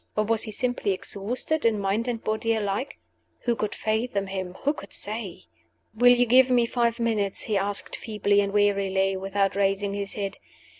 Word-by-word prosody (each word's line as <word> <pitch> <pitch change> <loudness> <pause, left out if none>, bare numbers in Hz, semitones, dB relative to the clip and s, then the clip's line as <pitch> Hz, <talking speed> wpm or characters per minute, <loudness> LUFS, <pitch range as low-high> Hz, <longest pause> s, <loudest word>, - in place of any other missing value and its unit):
Or 215 - +3
was 225 +1 +1
he 215 - -4
simply 245 -3 -1
exhausted 235 +11 -2
in 225 -2 +2
mind 200 +4 0
and 235 -2 -3
body 220 +1 0
alike? 210 +5 -2 0.4
Who 240 -1 0
could 215 -2 -3
fathom 215 -2 -1
him? 190 -1 -5
Who 290 - +2
could 200 -9 -11
say? 210 -4 -4 0.5
"Will 245 +3 +6
you 245 0 +3
give 255 +2 +5
me 245 -2 +4
five 235 0 0
minutes?" 215 -4 0
he 215 - -2
asked, 200 +1 0
feebly 205 -2 +1
and 200 0 -1
wearily, 195 -1 +2
without 195 +1 0
raising 200 0 +1
his 200 0 -4
head. 200 -1 -4
210 Hz, 180 wpm, -26 LUFS, 195-230 Hz, 0.5 s, Will